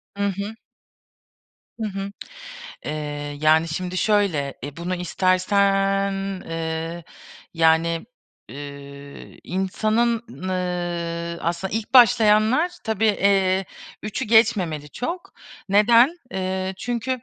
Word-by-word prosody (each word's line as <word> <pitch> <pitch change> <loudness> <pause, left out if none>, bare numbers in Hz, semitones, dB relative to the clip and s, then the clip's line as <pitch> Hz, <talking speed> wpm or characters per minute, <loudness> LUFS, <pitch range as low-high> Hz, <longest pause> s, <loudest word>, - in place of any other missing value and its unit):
Hı 200 - -2
hı. 200 +3 -5 1.3
Hı 215 - 0
hı. 195 0 -5 0.7
Eee, 145 -1 -5
yani, 160 +2 +4
şimdi 180 +2 -4
şöyle 185 -10 +1
e, 145 0 -7
bunu 175 +2 -3
istersen, 195 +2 +2 0.4
eee, 165 +1 -4 0.5
yani, 165 +2 +2 0.4
ııı, 140 +1 -10
insanın, 215 +5 0
n 230 - -11
ııı, 170 -2 -3
aslında 175 +3 -2
ilk 225 +3 -4
başlayanlar 230 - +5
tabii, 220 -1 -1
eee, 195 -2 +2 0.4
3'ü 215 +5 -3
geçmemeli 205 - +2
çok. 340 - -5 0.4
Neden? 235 - +5
Eee, 190 -1 -2
çünkü, 245 +3 -2
190 Hz, 100 wpm, -23 LUFS, 165-215 Hz, 1.3 s, başlayanlar